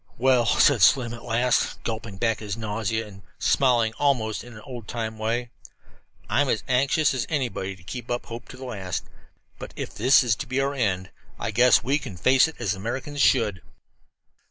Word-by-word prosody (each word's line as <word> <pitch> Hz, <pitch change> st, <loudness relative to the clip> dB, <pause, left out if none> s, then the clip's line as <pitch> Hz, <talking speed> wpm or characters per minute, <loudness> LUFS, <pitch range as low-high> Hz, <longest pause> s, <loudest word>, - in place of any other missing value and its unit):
"Well," 125 Hz, -1 st, +3 dB
said -, -, +4 dB
Slim 120 Hz, -3 st, +4 dB
at 115 Hz, -, -8 dB
last, 120 Hz, +1 st, 0 dB
gulping 110 Hz, -3 st, -5 dB
back 115 Hz, +1 st, 0 dB
his 105 Hz, -2 st, -5 dB
nausea, 110 Hz, 0 st, -2 dB
and 100 Hz, -2 st, -13 dB, 0.2 s
smiling 120 Hz, -4 st, +2 dB
almost 120 Hz, -7 st, +1 dB
in 120 Hz, 0 st, -12 dB
his 105 Hz, -, -11 dB
old 120 Hz, -5 st, -8 dB
time 110 Hz, -2 st, -4 dB
way, 115 Hz, +2 st, -2 dB, 0.8 s
"I'm -, -, +1 dB
as -, -, 0 dB
anxious 135 Hz, +4 st, +2 dB
as 130 Hz, -, -2 dB
anybody 120 Hz, -10 st, -2 dB
to 95 Hz, -, -19 dB
keep 120 Hz, +7 st, -7 dB
up 120 Hz, 0 st, -2 dB
hope 115 Hz, +1 st, -8 dB
to 130 Hz, -, -11 dB
the 130 Hz, -, -8 dB
last. 95 Hz, -8 st, -4 dB, 0.5 s
But -, -, -8 dB
if -, -, -6 dB
this 130 Hz, +5 st, +5 dB
is 120 Hz, -4 st, +2 dB
to -, -, -5 dB
be 130 Hz, +2 st, -1 dB
our 140 Hz, +1 st, 0 dB
end, 95 Hz, -8 st, -1 dB, 0.3 s
I 110 Hz, -, -3 dB
guess 120 Hz, +3 st, +5 dB
we 140 Hz, +4 st, +1 dB
can 110 Hz, -11 st, -8 dB
face 130 Hz, -, +4 dB
it 160 Hz, -, -9 dB
as 110 Hz, -5 st, -1 dB
Americans 130 Hz, +8 st, -4 dB
should." 105 Hz, -10 st, +3 dB
120 Hz, 190 wpm, -25 LUFS, 110-130 Hz, 0.8 s, this